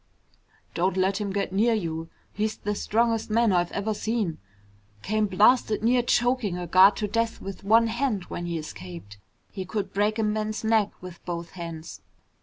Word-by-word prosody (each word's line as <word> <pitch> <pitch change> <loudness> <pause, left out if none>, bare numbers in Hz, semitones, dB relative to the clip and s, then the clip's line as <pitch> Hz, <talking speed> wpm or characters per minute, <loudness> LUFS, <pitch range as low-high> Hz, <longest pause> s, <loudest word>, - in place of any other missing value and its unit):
"Don't 185 +2 0
let 190 +2 +1
him 200 -1 -2
get 200 -1 -2
near 225 +4 +3
you. 165 -5 -3 0.2
He's 215 +1 -2
the 210 - -2
strongest 225 +2 0
man 230 0 +3
I've 175 -1 +1
ever 205 +2 -1
seen. 215 -6 -2 0.6
Came 215 0 +1
blasted 215 +2 +3
near 245 +2 +4
choking 240 -5 +1
a 180 - -4
guard 185 +4 +6
to 210 - -2
death 230 +2 -1
with 195 -1 -8
one 225 +3 +5
hand 230 -3 -1
when 175 0 -6
he 170 -1 -2
escaped. 100 - -9 0.3
He 190 - -5
could 195 +2 -4
break 210 +2 +1
a 220 - +1
man's 215 +1 -1
neck 220 -2 +3
with 180 -2 -10
both 170 -1 -5
hands." 165 -2 -8
205 Hz, 175 wpm, -26 LUFS, 180-220 Hz, 0.6 s, guard